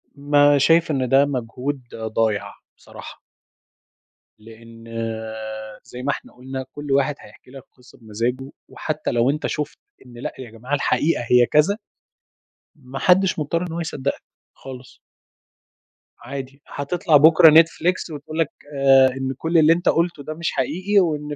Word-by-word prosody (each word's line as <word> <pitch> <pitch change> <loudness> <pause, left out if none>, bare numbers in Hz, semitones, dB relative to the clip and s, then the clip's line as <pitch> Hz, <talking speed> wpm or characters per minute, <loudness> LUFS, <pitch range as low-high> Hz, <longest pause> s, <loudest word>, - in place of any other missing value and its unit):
ما 145 0 +3
شايف 165 +3 +3
إن 130 -3 -1
ده 135 +1 +5
مجهود 130 +1 -4
ضايع، 110 -1 -2 0.2
بصراحة. - - -12 1.2
لأن 115 +1 -15 1.0
زي 125 +1 -10
ما 145 - 0
إحنا - - -8
قُلنا 130 +1 -7
كل 145 -1 -7
واحد 140 +1 +2
هيحكي 105 +4 -17
لك 135 -2 -11
قصّة 125 -1 -20
بمزاجُه، 120 +5 -4 0.2
وحتى 155 -1 -4
لو 120 +2 +2
أنت 150 +2 -1
شُفت 150 -1 -4 0.3
إن 125 - -15
لأ 120 - -5
يا 120 -4 -9
جماعة 125 +5 -8
الحقيقة 145 -1 0
هي 125 -1 +6
كذا، 150 - +2 1.0
ما 135 -2 -9
حدش 185 -1 +3
مضطّر 155 +3 -1
إن 180 -2 -5
هو 170 - -4
يصدّقك، 140 -4 -3 0.3
خالص. 130 -1 -12 1.2
عادي، 135 0 -8
هتطلع 150 +2 +1
بُكرة 160 +2 +7
نتفليكس 165 +3 +3
وتقول 155 +2 -7
لك 160 -3 +1 0.3
آآ، 135 -1 +5
إن 135 0 -3
كُلّ 165 +1 0
اللي 160 +1 +6
أنت 175 - 0
قُلتُه 165 -3 0
ده 155 - -6
مش 170 +1 -3
حقيقي، 185 +10 0
وإن 150 -4 -1
140 Hz, 145 wpm, -21 LUFS, 125-160 Hz, 1.2 s, بُكرة